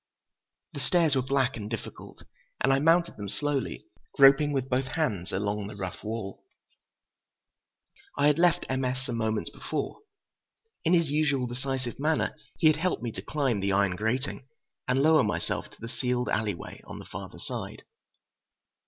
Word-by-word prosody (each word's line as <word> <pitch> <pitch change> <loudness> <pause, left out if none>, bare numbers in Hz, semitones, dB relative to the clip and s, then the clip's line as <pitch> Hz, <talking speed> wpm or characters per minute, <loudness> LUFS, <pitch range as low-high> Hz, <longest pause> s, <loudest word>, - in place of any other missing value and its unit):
The - - -5
stairs 165 -6 +3
were 130 - +3
black 130 0 +1
and 105 -2 -6
difficult, 115 -2 -7 0.4
and 135 - +3
I 135 - +3
mounted 165 +3 +3
them 100 -1 -5
slowly, 145 +3 -2 0.3
groping 140 +2 +7
with 135 -2 -1
both 130 0 +1
hands 110 - -1
along 105 0 -1
the 105 - -8
rough 95 -2 -6
wall. 110 -3 -5 1.7
I 145 - +3
had 150 +2 +4
left 175 0 +4
M. 130 0 -1
S. 130 +1 -1
some 125 - -3
few 115 - -1
moments 110 -1 -1
before. - - -4 0.8
In 170 +1 +3
his 170 -4 +3
usual 145 -4 +2
decisive 130 0 -4
manner 155 +2 +1 0.2
he 170 - 0
had 155 -1 +6
helped 170 -7 -1
me 120 - -2
to - - -6
climb 135 -8 0
the 100 0 0
iron 100 -2 +2
grating 125 +6 -2 0.4
and 130 +2 +2
lower 160 0 +6
myself 85 -5 -2
to - - -20
the 115 - -6
sealed 125 +1 -1
alley 105 -3 0
way - - -10
on - - -7
the - - -9
farther - - -8
side. - - -6
130 Hz, 170 wpm, -28 LUFS, 110-145 Hz, 1.7 s, groping